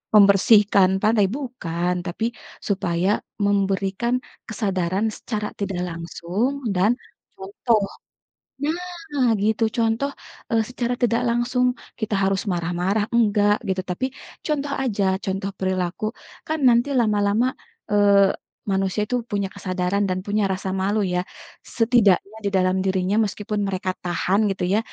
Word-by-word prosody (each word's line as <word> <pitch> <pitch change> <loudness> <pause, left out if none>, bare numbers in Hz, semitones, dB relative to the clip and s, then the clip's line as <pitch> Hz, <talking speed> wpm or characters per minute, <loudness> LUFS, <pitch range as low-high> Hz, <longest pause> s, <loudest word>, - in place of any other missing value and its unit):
membersihkan 200 -1 +6
pantai, 215 -2 +4
bukan, 185 - -2
tapi 180 +5 -3 0.4
supaya 190 0 +1 0.2
memberikan 200 +3 +1 0.3
kesadaran 195 -2 -1
secara 210 -2 -4
tidak 195 -3 -3
langsung 180 +10 -3
dan, 205 +6 +2 0.4
contoh 205 +2 0 1.3
nah, 255 -5 +3
gitu, 215 +2 +1
contoh, 230 +5 +1 0.4
eee, 230 - +3
secara 245 -1 -2
tidak 235 -1 +2
langsung 240 +2 +1 0.3
kita 220 -2 -4
harus 195 0 +1
marah-marah 180 +4 0
enggak 205 -2 +4
gitu 190 -1 0
tapi 180 +7 -2 0.4
contoh 290 -2 -1
aja 215 -6 0 0.2
contoh 195 0 -2
perilaku 185 0 -2 0.4
kan 315 0 -1
nanti 240 +3 +4
lama-lama, 210 +1 +2 0.4
eee, 200 -1 +5 0.3
manusia 195 +1 0
itu 250 - 0 0.2
punya 200 -1 0
kesadaran 185 +1 -1
dan 185 0 -1
punya 210 +1 +1
rasa 190 0 -4
malu 205 +3 +1
ya, 180 - +1 0.6
setidaknya 220 -3 +3
di - - +2
dalam 185 -1 +2
dirinya 190 +1 +1
meskipun 210 +1 -3
mereka 185 -1 -1
tahan 180 +2 +1
gitu 190 - -3
ya, 210 - +4
200 Hz, 125 wpm, -23 LUFS, 190-225 Hz, 1.3 s, membersihkan